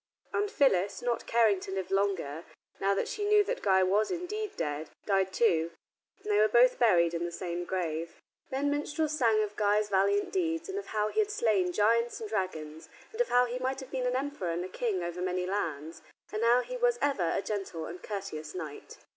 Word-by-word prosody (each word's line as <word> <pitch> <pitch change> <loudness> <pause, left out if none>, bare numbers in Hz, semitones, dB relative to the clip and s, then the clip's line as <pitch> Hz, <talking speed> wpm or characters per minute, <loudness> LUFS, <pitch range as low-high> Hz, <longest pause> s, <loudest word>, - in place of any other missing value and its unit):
And 415 0 0
Phyllis, 205 - +2
not 240 -1 -1
caring 225 -4 +4
to 185 - -8
live 190 -1 -4
longer, 190 -6 0 0.4
now 195 0 +2
that - - -1
she 420 - -4
knew 415 0 +5
that - - -3
Guy 190 -1 +4
was 200 +4 +2
indeed 410 +4 -4
dead, 150 0 -3 0.2
died 195 -2 +2
too, 170 -7 +2 0.5
and 210 - -2
they 205 - +4
were 215 - +6
both 240 +4 +4
buried 175 -8 +4
in 170 0 -2
the 175 - -3
same 175 0 -4
grave. 165 -3 -3 0.3
Then 280 +2 0
minstrels 300 +1 -1
sang 225 -6 +3
of 210 0 -5
Guy's 210 0 +2
valiant 200 +1 +2
deeds, 330 -2 -1
and 390 +1 -2
of 405 - -9
how 210 0 0
he - - -1
had 425 -1 +2
slain 205 - +1
giants 230 +5 +2
and 220 - -5
dragons, 160 -7 -4 0.2
and 455 +1 -1
of 485 - 0
how 245 0 +5
he 245 +1 -4
might 260 +1 -2
have 265 -1 -10
been 255 -1 -1
an 250 - 0
emperor 270 -9 -2
and 170 +2 -2
a - - -7
king 205 -6 -2
over 175 +1 -4
many 180 0 -1
lands, 165 -5 -3 0.3
and 215 +1 -1
how 240 +2 +5
he - - -6
was 485 -1 +2
ever 205 -13 +1
a 195 - -1
gentle 195 -6 -4
and 175 +1 -8
courteous 190 -7 -6
knight. 155 -5 -7
205 Hz, 215 wpm, -30 LUFS, 180-255 Hz, 0.5 s, were